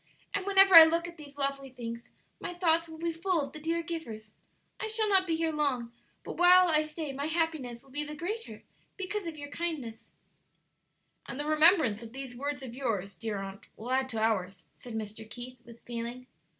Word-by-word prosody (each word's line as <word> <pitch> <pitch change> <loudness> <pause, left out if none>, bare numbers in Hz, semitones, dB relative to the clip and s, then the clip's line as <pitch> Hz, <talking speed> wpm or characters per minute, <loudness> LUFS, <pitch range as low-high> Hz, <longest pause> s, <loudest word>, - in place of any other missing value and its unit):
and 400 -1 -2
whenever 390 -1 +6
I 330 -1 +14
look 335 +1 0
at 345 0 -11
these 290 -2 -13
lovely 275 -1 -1
things 235 -2 -6 0.4
my 355 - -5
thoughts 335 -2 +2
will 320 - -9
be 335 +1 -2
full 350 +1 0
of 280 -2 -4
the 305 - -7
dear 330 +2 -1
givers. 230 -11 -6 0.5
I 435 - -2
shall 440 0 0
not 385 -2 +4
be 330 - +1
here 325 0 0
long, 270 -6 0 0.3
but - - -7
while 360 0 +7
I 305 -1 +4
stay 305 -2 -5
my 280 +2 -3
happiness 315 -7 -2
will 270 - -20
be 295 +2 -2
the 300 0 -7
greater 420 +9 -5 0.3
because 390 0 -3
of 320 -2 -6
your 290 -1 -8
kindness," 290 -11 -5 1.2
"And 270 - -6
the 295 - -2
remembrance 310 - +5
of 230 0 -10
these 265 -2 -7
words 285 +1 -3
of 245 -3 -7
yours, 220 -7 -2
dear 220 0 -4
aunt, 195 0 -7
will 235 +4 -6
add 260 0 +1
to 225 -3 -2
ours," 195 -5 0 0.2
said 240 -2 -8
Mr. 220 0 -6
Keith, 245 +2 -8
with 235 -1 -15
feeling. 240 +1 -5
290 Hz, 205 wpm, -30 LUFS, 235-335 Hz, 1.2 s, I